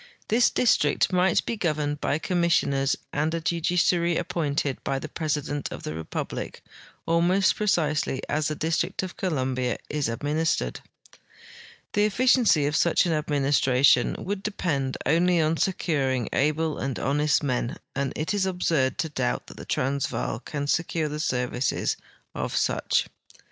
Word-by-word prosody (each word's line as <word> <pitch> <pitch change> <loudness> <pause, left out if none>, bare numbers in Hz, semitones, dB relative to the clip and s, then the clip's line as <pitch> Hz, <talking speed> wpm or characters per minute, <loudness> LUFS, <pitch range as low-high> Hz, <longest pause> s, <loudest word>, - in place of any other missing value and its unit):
This 235 +3 +4
district 180 -6 +2
might 180 0 +3
be 235 - -2
governed 150 -6 -1
by 145 - +1
commissioners 160 -5 +1 0.2
and 150 +2 0
a - - -1
judiciary 170 +1 +1
appointed 145 -4 -2
by 135 - -1
the 145 - -5
president 145 -2 -3
of - - -7
the 75 - -4
republic, 80 0 -5 0.4
almost 175 +4 +3
precisely 155 -9 0
as 150 0 0
the 155 - -2
District 160 +4 -1
of 185 - -6
Columbia 130 -8 -1
is 150 -4 -1
administered. 145 - -1 1.1
The 205 0 +3
efficiency 225 - +3
of 145 +1 0
such 170 +2 +3
an 170 - +1
administration 140 -4 +3
would 195 +1 -4
depend 150 -10 -2
only 170 +4 +3
on 160 +1 +2
securing 135 - 0
al^le 155 +2 0
and 135 -3 -2
honest 150 +2 +1
men, 125 -3 -1 0.2
and 135 0 -1
it 155 +6 -2
is 195 -2 +1
absurd 165 -7 0
to 160 - -1
doubt 65 - -2
that - - -13
the - - -8
Transvaal 125 - -1
can 145 -1 -4
secure 160 +1 0
the 150 +1 -5
services 125 -3 -1 0.4
of - - -3
such. - - +1
150 Hz, 145 wpm, -26 LUFS, 135-170 Hz, 1.1 s, This